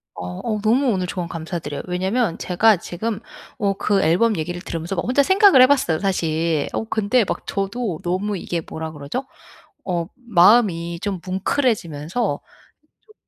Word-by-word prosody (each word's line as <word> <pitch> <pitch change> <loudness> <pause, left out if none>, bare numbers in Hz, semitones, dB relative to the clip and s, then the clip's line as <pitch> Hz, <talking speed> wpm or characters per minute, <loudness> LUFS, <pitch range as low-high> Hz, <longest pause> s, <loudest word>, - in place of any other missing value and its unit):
어 90 0 -6
어 215 -2 -1
너무 245 +6 +2
오늘 185 -5 0
조언 175 -1 -4
감사드려요. 165 -3 -5
왜냐하면 190 +3 0
제가 205 +4 +3
지금 200 +5 -4 0.4
어 200 -1 +1
그 200 -1 +1
앨범 195 +7 +3
얘기를 175 +3 -3
들으면서 170 +3 -4
막 170 - -1
혼자 260 +4 +3
생각을 380 -5 +6
해봤어요 255 - +3
사실. 165 -5 0
어 - - -1
근데 220 +2 +1
막 - - -4
저도 195 -2 -2
너무 190 +3 -1
이게 170 -1 -3
뭐라 160 0 -5
그러죠? 150 - -5 0.6
어 175 -2 -1
마음이 185 -7 +3
좀 195 -3 -2
뭉클해지면서 185 - -1 0.7
좀 430 - -21
190 Hz, 320 characters per minute, -21 LUFS, 170-225 Hz, 0.7 s, 생각을